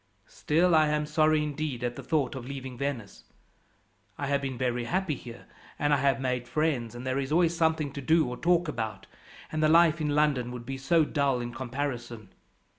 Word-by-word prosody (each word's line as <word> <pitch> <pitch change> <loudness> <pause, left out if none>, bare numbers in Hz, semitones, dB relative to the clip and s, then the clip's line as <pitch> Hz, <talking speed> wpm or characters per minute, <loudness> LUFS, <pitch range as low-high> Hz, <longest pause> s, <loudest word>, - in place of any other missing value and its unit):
Still 170 +4 +1
I 155 -1 +5
am 150 0 0
sorry, 155 0 +2
indeed, 145 -4 -3
at 120 0 -2
the - - -7
thought 150 -6 0
of 130 -2 -7
leaving 130 -2 -6
Venice. 125 -6 -5 0.9
I 140 - -3
have 140 0 0
been 135 -2 -4
very 125 -1 -1
happy 185 +3 0
here, 120 -3 -10 0.3
and 145 -1 +1
I - - +4
have 135 0 +2
made 125 -2 -2
friends, 125 -5 -1
and 120 +1 -7
there 130 +1 0
is 135 +1 -3
always 170 +1 +3
something 160 -3 +1
to 140 - -5
do 160 +2 +3
or 125 - -4
talk 175 +3 +2
about; 110 -8 -4 0.5
and 155 - -2
the 155 - +4
life 165 -1 +5
in 150 - 0
London 145 -5 +2
would 120 -1 -7
be 135 +1 -5
so 160 +3 +3
dull 140 -4 0
in 120 0 -5
comparison. 120 -5 -5
140 Hz, 200 wpm, -28 LUFS, 125-155 Hz, 0.9 s, I